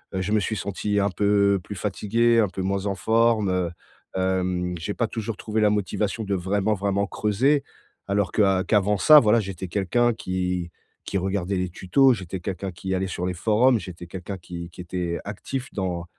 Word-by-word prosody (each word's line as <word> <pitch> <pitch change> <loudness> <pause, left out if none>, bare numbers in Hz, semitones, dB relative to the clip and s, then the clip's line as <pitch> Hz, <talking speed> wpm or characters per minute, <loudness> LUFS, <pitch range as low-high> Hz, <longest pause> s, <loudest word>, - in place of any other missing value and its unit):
heu 95 - 0
je 100 +3 -2
me 110 - +4
suis 110 +2 -2
senti 100 +1 -1
un 100 -1 +1
peu 100 0 +3
plus 105 - -7
fatigué, 115 +4 +1
un 105 -4 +3
peu 95 - -5
moins 100 +1 -1
en 100 - -1
forme, 110 0 +2
heu, 90 -2 0 0.5
hem 90 -1 0
j'ai 100 +5 -4
pas 115 - 0
toujours 110 -2 -4
trouvé 110 0 -2
la 105 - +5
motivation 105 +2 -1
de 100 -1 -2
vraiment, 100 +3 0
vraiment 100 0 0
creuser. 130 +10 +1 0.4
Alors 100 -2 0
que, 110 - +1
heu, 95 -2 +3
qu'avant 105 0 +2
ça, 150 +11 +8
voilà, 115 -1 +4
j'étais 95 -2 -5
quelqu'un 110 +6 +2
qui 90 -3 -3 0.3
qui 100 - -2
regardait 95 0 -1
les 90 -1 -1
tutos, 125 +10 +3
j'étais 95 -3 -5
quelqu'un 95 +1 -4
qui 95 +2 -4
allait 95 +1 0
sur 90 0 -4
les 90 - -1
forums, 110 +6 +3
j'étais 85 -1 -9
quelqu'un 95 +2 -6
qui 85 0 -8
qui 90 - -18
était, 90 -1 -3
heu, - - -9
actif 125 +6 -5
dans 90 -4 -3
100 Hz, 200 wpm, -24 LUFS, 90-105 Hz, 0.5 s, ça